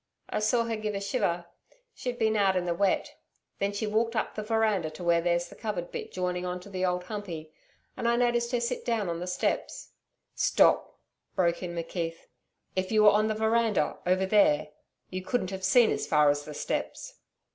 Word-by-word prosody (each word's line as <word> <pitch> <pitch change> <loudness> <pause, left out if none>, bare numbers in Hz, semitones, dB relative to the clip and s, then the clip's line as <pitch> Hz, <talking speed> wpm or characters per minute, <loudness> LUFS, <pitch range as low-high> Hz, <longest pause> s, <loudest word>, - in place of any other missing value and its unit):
I - - 0
saw 230 +2 +2
her 230 -1 -2
give 215 -1 -3
a - - -1
shiver 195 -5 -1 0.5
she'd 245 -1 -4
been 220 -2 +2
out 195 -2 +3
in 180 -1 0
the 175 - 0
wet. 190 +2 0 0.4
Then 200 0 0
she 205 +2 -2
walked 225 +2 0
up - - -1
the 215 - -4
veranda 215 -6 +1
to 155 +3 -9
where 170 -1 +3
there's 175 0 +1
the - - -12
covered 205 -6 -4
bit - - -6
joining 180 -1 -2
on 180 0 -3
to 200 - -12
the 185 -1 -3
Old 180 -1 0
Humpey, 180 -6 -6 0.4
and 235 - -2
I 235 - +3
noticed 240 -1 +1
her 245 - +1
sit 240 +1 -2
down 225 -6 0
on 170 0 -3
the 180 - -5
steps 180 - -2 0.2
' - - -52 0.2
'Stop,' - - +3 0.4
broke 170 -2 +1
in 175 -2 -5
McKeith. 165 0 -4 0.5
'If 185 +2 -1
you 215 -1 +4
were 210 - +9
on 210 +1 +3
the 215 - -1
veranda 220 -5 +1
over 185 +1 +3
there, 190 -7 +3 0.4
you 185 0 -3
couldn't 190 -1 -1
have 190 0 -6
seen 220 +5 +5
as - - -2
far 150 -1 +5
as 145 0 -3
the 150 - -8
steps.' - - -4
195 Hz, 210 wpm, -28 LUFS, 175-220 Hz, 0.5 s, were